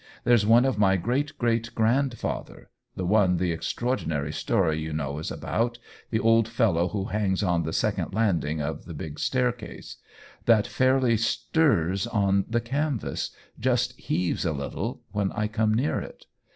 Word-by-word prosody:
There's 120 -4 +4
one 120 +3 +6
of 130 -5 0
my 95 -2 +4
great 130 - -1
great 115 -1 0
grandfather 120 +3 -1 0.2
(the 90 - -3
one 95 -2 +3
the 90 0 0
extraordinary 80 - -2
story 80 0 +1
you 80 0 -4
know 70 -1 -3
is 80 - -4
about— 120 +1 -2 0.3
the 110 - 0
old 115 0 +4
fellow 110 -7 +2
who 95 0 -3
hangs 105 -2 0
on 90 -3 +2
the 80 0 -3
second - - -1
landing 85 -8 0
of 80 +1 -4
the - - -8
big 75 -1 -7
staircase) 125 -3 -2 0.5
that 110 -3 +5
fairly 130 -3 +2
stirs 110 - +1
on 100 -4 +1
the 120 +1 +1
canvas 135 0 -2 0.2
— - - -25
just 125 0 +1
heaves 90 -1 -1
a 85 -4 0
little 70 -1 -4
— - - -41
when 100 -1 -1
I 105 - -1
come 110 0 +1
near 130 +6 +1
it. - - -10
105 Hz, 165 wpm, -26 LUFS, 90-120 Hz, 0.5 s, one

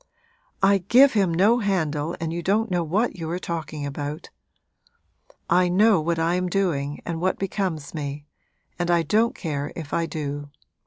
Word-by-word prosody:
'I 195 0 +5
give 265 +4 +6
him 195 -5 +2
no 205 +8 +4
handle 165 -7 -1
and 165 0 -3
you 170 - -3
don't 210 +5 +1
know 175 -1 +1
what 195 +8 0
you 165 -2 -5
are 175 - -2
talking 160 -4 -5
about! 145 +2 -5 1.2
I 180 0 +3
know 200 0 +4
what 170 +2 -1
I 165 +1 +1
am 180 0 0
doing 150 -7 -1
and 165 -1 -4
what 185 +1 +1
becomes 185 -6 -3
me, 145 -2 -5 0.5
and 175 0 -1
I 170 -1 +3
don't 220 +9 +2
care 145 -4 -3
if 160 -3 -7
I 165 0 +1
do. 145 -2 -5
170 Hz, 170 wpm, -24 LUFS, 155-195 Hz, 1.2 s, give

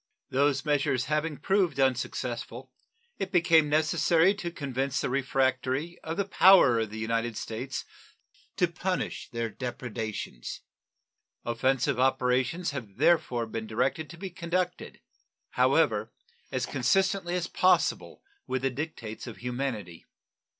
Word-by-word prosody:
Those 140 +1 +2
measures 140 -4 +1
having 150 0 -1
proved 190 -1 +1
unsuccessful, 125 -1 -2 0.5
it 190 - -3
became 165 -4 +4
necessary 160 +4 +3
to 195 -4 -5
convince 140 -4 -2
the - - -2
refractory 135 +4 0
of 160 +1 -5
the 200 - +1
power 190 - +6
of 110 -2 -1
the 110 - -8
United 115 +1 -1
States 125 +4 -5 0.7
to 180 - +3
punish 180 +2 -3
their 115 -1 -2
depredations. 115 - -5 0.8
Offensive 130 +2 +1
operations 130 +6 +1
have 110 -8 -7
therefore 140 -6 +2
been 110 0 -5
directed, 130 +7 -1
to 170 - -10
be 190 +1 -6
conducted, 180 +1 -3 0.5
however, - - +2 0.4
as - - -1
consistently 190 -2 +1
as 180 -2 -1
possible 185 - +1 0.2
with 130 0 -2
the 135 - +1
dictates 125 -6 -6
of 115 -5 -8
humanity. 120 -7 -4
135 Hz, 120 wpm, -28 LUFS, 120-170 Hz, 0.8 s, power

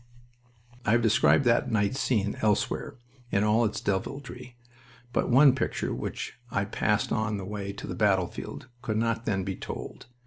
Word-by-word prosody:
I 105 - +2
have 120 0 +3
described 115 +5 +4
that 120 0 +3
night 105 +2 +1
scene 105 -6 0
elsewhere, 105 -1 0 0.4
in 100 - +2
all 110 +2 +3
its 105 - -2
deviltry, 125 +4 -4 0.6
but - - +1
one 135 +2 +7
picture 130 - -2
which - - -5
I - - 0
passed - - 0
on 110 -1 0
the 95 - -5
way 100 0 -4
to 100 - -8
the - - -5
battlefield 100 +2 -1
could 110 -3 -2
not 115 0 0
then 95 -3 0
be 95 0 -3
told. - - -7
110 Hz, 165 wpm, -28 LUFS, 100-120 Hz, 0.6 s, one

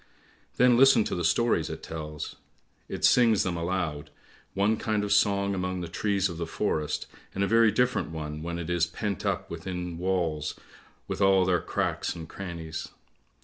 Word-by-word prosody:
Then 125 -1 +5
listen 135 -3 +7
to - - -3
the 90 - -2
stories 85 -2 +2
it - - -7
tells; 75 -2 -6 0.5
it - - 0
sings 115 -4 +5
them 90 -2 -1
aloud, 85 -4 -2 0.5
one 100 +3 +3
kind 110 -2 -1
of 105 0 +1
song 100 -1 +3
among 90 -1 -2
the 85 - -4
trees 100 +1 0
of 85 - -7
the 85 - -3
forest, 75 -1 -1 0.3
and 95 - +1
a - - +2
very 115 0 +5
different 125 -1 +1
one 75 -1 -5
when 85 +1 -4
it 85 -2 -5
is 85 -1 +2
pent 100 -4 -3
up - - -2
within 90 0 -5
walls 85 -5 -1 0.5
with - - -4
all 95 -1 +5
their 90 -3 +2
cracks - - -2
and 80 -1 -7
crannies. 85 -4 -6
90 Hz, 175 wpm, -28 LUFS, 80-100 Hz, 0.5 s, listen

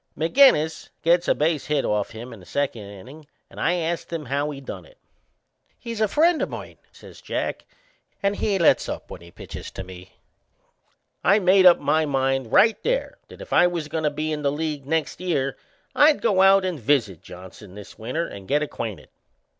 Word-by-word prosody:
McInnes 160 - +3
gets 170 +2 +3
a - - +3
base 155 -1 0
hit 150 -2 0
off 105 -1 -1
him 120 +2 -9
in 110 - -12
the 90 - -15
second 140 -5 -2
innin' 130 +11 -12 0.3
and - - -11
I 175 - +1
ast 170 0 -3
him 165 -3 -4
how 140 +3 -1
he 140 -2 -7
done 135 - -8
it. - - -20 0.8
"He's 230 -2 -6
a 215 - +3
friend 320 - +2
o' - - 0
mine," - - -9
says - - -15
Jack, - - -4 0.6
"and 200 +1 +1
he 205 -2 0
lets 170 - +3
up - - -7
when - - -9
he 85 - -14
pitches - - -9
to 95 - -6
me." 95 0 -12 1.1
I 195 +6 +5
made 185 -1 +5
up 175 - +7
my 155 0 +1
mind 135 -3 -1
right 220 -1 +4
there - - -2
that - - -13
if - - -7
I 175 - +6
was 170 -4 -4
goin' 160 +1 -3
to - - +3
be 155 +2 -3
in 150 -1 -3
the 140 -1 +1
league 150 -2 -4
next 160 0 -1
year 140 -7 -1 0.4
I'd 295 0 +5
go 190 -5 +2
out 195 0 +5
and 180 -5 -3
visit 110 - 0
Johnson 95 +2 -13
this 105 -1 -12
winter 130 +10 -3
and 100 -1 -11
get 150 +2 +1
acquainted. 110 - -6
150 Hz, 200 wpm, -23 LUFS, 130-180 Hz, 1.1 s, up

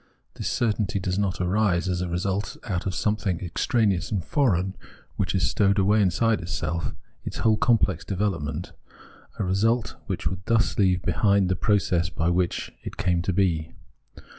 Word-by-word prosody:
This - - -3
certainty 105 -4 0
does 95 +1 -1
not 100 -2 -1
arise 95 -1 +1
as 90 -1 -1
a 90 - -1
result 95 +2 -2
out 95 -5 -2
of 95 - -2
something 105 -5 0
extraneous 95 +1 0
and 95 -6 -1
foreign 95 - +1 0.4
which 95 0 0
stowed 100 +2 +2
away 105 +2 +4
inside 105 +4 +2
itself 85 -1 -3 0.3
its - - -5
whole 110 -1 +3
complex 105 -6 +2
develop 100 -3 -1
ment; 75 +4 -5 0.7
a - - -1
result 110 +5 +1
which - - -3
would 90 -1 -2
thus 115 -1 +2
leave 90 -3 +3
behind 100 -3 +2
the 95 - +2
process 90 -4 +1
by 85 -1 0
which 90 0 -1
it - - -7
came 90 -2 +1
to 90 - -1
be. 85 -4 0
95 Hz, 165 wpm, -25 LUFS, 90-105 Hz, 0.7 s, away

